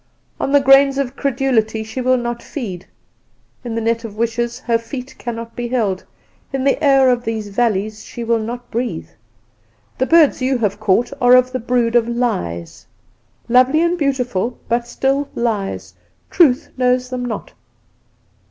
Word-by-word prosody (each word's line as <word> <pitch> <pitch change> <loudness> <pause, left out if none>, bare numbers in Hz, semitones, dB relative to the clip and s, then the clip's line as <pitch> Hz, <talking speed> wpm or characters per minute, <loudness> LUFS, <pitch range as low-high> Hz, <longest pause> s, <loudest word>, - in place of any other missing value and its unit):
On - - -1
the 285 - +6
grains 270 0 +5
of 275 -1 -2
credulity 245 -6 0
she 220 +4 -5
will 255 +1 +3
not 240 -1 -3
feed; 195 - -6 0.8
in 235 -2 -4
the 230 - -1
net 230 +1 0
of 215 -2 -8
wishes 235 +1 -1
her 230 -2 +1
feet 250 +2 -8
cannot 230 -1 -6
be 240 0 -3
held; 215 -7 -1 0.5
in 270 -2 -2
the 275 +3 +1
air 270 -2 +5
of 245 -1 0
these 220 -3 -3
valleys 215 -1 -1
she 235 - -7
will 230 0 +1
not 240 +2 -6
breathe. 240 +2 -3 0.9
The 260 - +1
birds 325 -5 +4
you 260 0 +1
have 205 -3 -1
caught 220 +5 +1
are 245 0 +7
of 255 0 +4
the 255 - -2
brood 240 0 0
of 235 -1 +4
Lies. 85 - -3 0.6
Lovely 255 +6 +4
and 340 +1 +2
beautiful, 250 - -1
but 235 +1 0
still 270 +3 -1
lies; 195 - -2 0.4
Truth 275 -8 +3
knows 250 0 +1
them 250 -1 -3
not. 245 -3 -5
240 Hz, 160 wpm, -18 LUFS, 225-260 Hz, 0.9 s, are